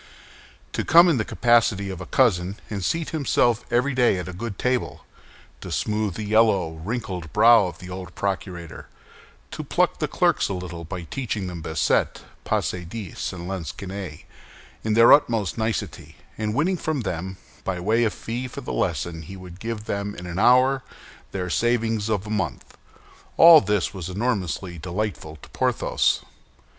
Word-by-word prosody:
To - - -1
come 170 +2 +7
in 155 - +2
the 110 - +1
capacity 110 -5 +2
of 95 -1 -7
a 90 - -7
cousin, 100 -9 +2 0.2
and 100 -3 -3
seat 165 - -1
himself 125 -6 +1
every 125 +4 +2
day 125 -6 +3
at 90 0 -5
a 95 - -6
good 110 +2 -5
table; 125 -1 -1 0.6
to - - -7
smooth 105 -3 -1
the 110 - -4
yellow, 105 -6 +3
wrinkled 90 -1 -5
brow 115 -2 +6
of 85 -2 -8
the 90 +1 -10
old 90 -1 -8
procurator; 90 -4 -4 0.6
to - - -5
pluck - - +1
the - - 0
clerks - - +1
a 100 - -2
little 85 -2 -6
by 90 +1 -6
teaching 110 - -4
them 90 -2 -6
bassette, 80 -1 0 0.2
passe 90 -1 -1
dix, 95 0 -5
and 85 -1 -7
lansquenet, 95 -1 -6 0.6
in 110 -1 0
their 115 +1 +8
utmost 110 - +2
nicety, 90 -8 -3 0.2
and 110 0 -2
winning 180 +7 +1
from 155 -5 -2
them, 95 -2 -4 0.3
by 95 -2 -2
way 110 +6 +2
of 110 - +2
fee 120 +5 -5
for - - -8
the - - -5
lesson 85 -1 -2
he 95 +5 -9
would 90 -1 -11
give 110 0 -5
them 100 0 -3
in 90 - -8
an 85 +1 -4
hour, 130 +4 +5 0.5
their 90 -2 -3
savings 115 +1 0
of 105 -2 -1
a - - -8
month—all 160 +8 +3
this 105 -4 0
was 95 -3 -6
enormously 95 -4 -2
delightful 90 -2 -4
to 75 - -15
Porthos. - - +1
100 Hz, 165 wpm, -24 LUFS, 90-115 Hz, 0.6 s, their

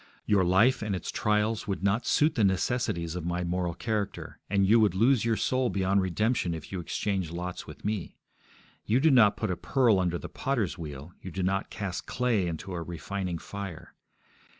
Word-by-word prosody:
Your 100 -2 +3
life 110 +9 +4
and 105 -2 -1
its 90 - -4
trials 105 +1 0
would 100 -1 -3
not 100 +4 +1
suit 155 +2 +3
the 115 -8 +1
necessities 95 -4 0
of 90 - -4
my 90 +1 -1
moral 90 -1 -1
character, 105 0 -3
and 100 0 +3
you 110 +4 +5
would 105 -5 +3
lose 115 +3 +4
your 115 -1 +2
soul 130 -1 +1
beyond 95 0 +1
redemption 95 0 0
if 80 - -9
you 95 - -3
exchanged 95 0 -2
lots 90 +1 -5
with - - -11
me. 105 -3 -3 0.7
You 115 +4 +2
do 160 +3 +4
not 110 -5 +5
put 110 -4 -1
a - - 0
pearl 115 +1 +2
under 90 -1 0
the - - -7
potter's 120 -10 -1
wheel; 75 -1 -8
you 95 - -7
do 95 +2 -3
not 95 +2 0
cast 95 -4 -5
clay 120 -7 +1
into 85 +3 -5
a 85 - -3
refining 85 +2 -4
fire. 90 -2 -8
95 Hz, 195 wpm, -28 LUFS, 90-110 Hz, 0.7 s, you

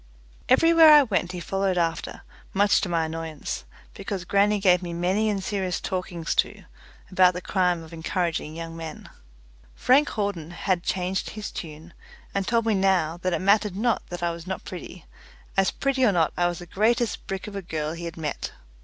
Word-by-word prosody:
Everywhere 330 +4 +7
I 295 -1 +9
went 195 -7 -1
he 180 - -5
followed 195 +1 -1
after, 165 -2 -2 0.3
much 200 +1 +4
to 195 - -2
my 165 -2 +1
annoyance, 160 -1 -5 0.3
because 195 -6 -5
grannie 205 +2 +3
gave 180 -2 +4
me 175 -2 -5
many 185 +6 +1
and 200 -2 -2
serious 190 -3 -2
talkings 180 -3 -3
to - - -12 0.5
about 185 -1 +5
the - - -2
crime 180 -3 0
of 160 +1 -13
encouraging 165 -1 -2
young 165 0 -6
men. 160 -2 -8 0.6
Frank 280 +4 +4
Hawden 200 -7 -3
had 175 0 -1
changed 185 +1 -2
his 215 -1 -6
tune, 160 +1 -8 0.4
and 195 -1 -1
told 230 -1 +2
me 225 - +2
now 190 -4 +2
that 185 +1 -2
it 175 - -1
mattered 200 0 +3
not 235 +3 +1
that 175 -1 -6
I 170 - +1
was 170 +1 -9
not 190 - -5
pretty, 180 -1 -9 0.5
as 195 -1 +3
pretty 275 -2 0
or 230 - +5
not 165 -4 +1
I 175 - +2
was 175 -1 -3
the 175 - -9
greatest 230 +6 0
brick 195 -1 -4
of 210 - -8
a 195 - -3
girl 155 -3 -3
he 170 0 -7
had 170 0 -7
met. 155 -3 -4
185 Hz, 190 wpm, -25 LUFS, 170-205 Hz, 0.6 s, I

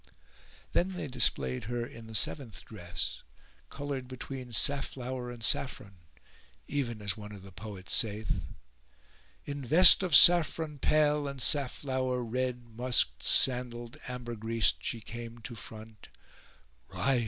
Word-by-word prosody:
Then 190 +2 +1
they 180 - -5
displayed 95 - 0
her 120 +1 -3
in 115 -1 -11
the 110 - -8
seventh 115 +1 -2
dress, 90 -5 -5 0.5
coloured 140 -3 -5
between 130 0 -7
safflower 130 0 0
[FN#416] - - -6
and 115 - -10
saffron, 105 -6 0 0.7
even 120 -7 -3
as 100 -2 -1
one 105 -1 -9
of 100 -2 -11
the 95 - -12
poets 95 0 -7
saith:— 110 -1 +1 1.0
In 145 -1 -5
vest 170 +11 +8
of 180 -6 +2
saffron 160 -3 +6
pale 150 -1 +2
and 140 -1 -6
safflower 130 -2 +1
red 125 +1 -2
* - - -21
Musk'd, 120 - +1
sandal'd 125 0 +1
ambergris'd, 115 -2 -1
she 115 - -4
came 115 +1 -8
to 120 - -7
front: 110 -1 -11 0.8
"Rise!" 135 -2 +1
125 Hz, 130 wpm, -30 LUFS, 110-135 Hz, 1.0 s, vest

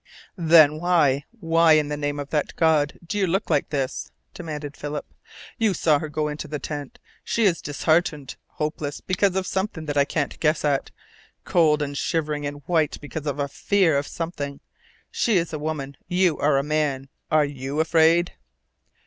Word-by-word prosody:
"Then 160 -3 +5
why 155 -6 +2 0.2
why 165 -1 +4
in 150 -1 +3
the 150 - -2
name 145 0 -3
of 145 0 -6
that 150 -2 -1
God 155 -3 +2
do 205 +5 -3
you 190 - +2
look 190 +4 -1
like - - +1
this?" 135 -2 -3 0.2
demanded 150 -3 -6
Philip. 145 0 -5 0.5
"You 215 -4 +2
saw 155 -3 +3
her 155 - -5
go 150 +1 -1
into 150 0 -5
the 150 - -4
tent. 145 - -6 0.3
She 230 - 0
is 180 -6 +2
disheartened, 150 -1 0
hopeless 150 -1 -4
because 190 0 0
of 190 -1 0
something 190 -4 -3
that 145 -1 -3
I 140 - +5
can't 145 -1 -2
guess 155 -1 +1
at, 140 -2 0 0.5
cold 155 -3 +3
and 145 0 -5
shivering 150 -1 -1
and 145 0 -7
white 160 -4 +1
because 150 +1 -6
of 145 -1 -2
a 140 -1 -1
FEAR 185 +2 +2
of 140 +1 0
something. 145 -4 -5 0.5
She 225 -5 +2
is 170 -1 -1
a 155 - -3
woman. 145 -2 -4
You 180 -2 +2
are 145 -1 +3
a 135 - +1
man. 145 -3 -1 0.2
Are 155 -1 +4
YOU 140 +1 -4
afraid?" 165 +2 +3
155 Hz, 180 wpm, -24 LUFS, 145-165 Hz, 0.5 s, Then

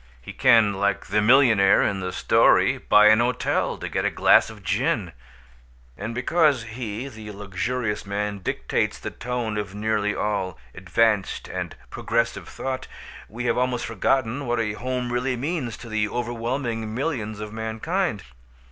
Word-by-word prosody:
He 60 - -10
can 115 -6 +5
(like 100 0 -1
the 105 - +1
millionaire 115 -4 +5
in 100 - 0
the 90 -1 -3
story) - - +3
buy 105 0 +6
an 110 +1 +6
hotel 120 +1 0
to - - -5
get - - -2
a - - +2
glass - - +4
of - - -12
gin. - - 0 0.8
And 115 +2 -5
because 145 0 +2
he, 110 +1 -5
the 110 -5 -10
luxurious 105 +3 -3
man, 100 0 -3
dictates 90 - -1
the - - -6
tone 120 -3 -3
of 100 -1 -6
nearly 105 -1 0
all 100 -5 -2 0.2
"advanced" 100 +2 0
and - - -5 0.2
"progressive" 115 +1 -1
thought, 130 -1 -4 0.4
we 120 +3 -5
have 125 - +1
almost 125 -1 0
forgotten 125 +4 0
what 120 0 0
a 105 -2 -1
home 125 +2 -3
really 125 +1 0
means 135 -3 -3
to 120 - -11
the 110 -2 -1
overwhelming 120 -1 -3
millions 115 -7 -3
of 105 0 -7
mankind. 110 - -2
115 Hz, 155 wpm, -24 LUFS, 105-125 Hz, 0.8 s, buy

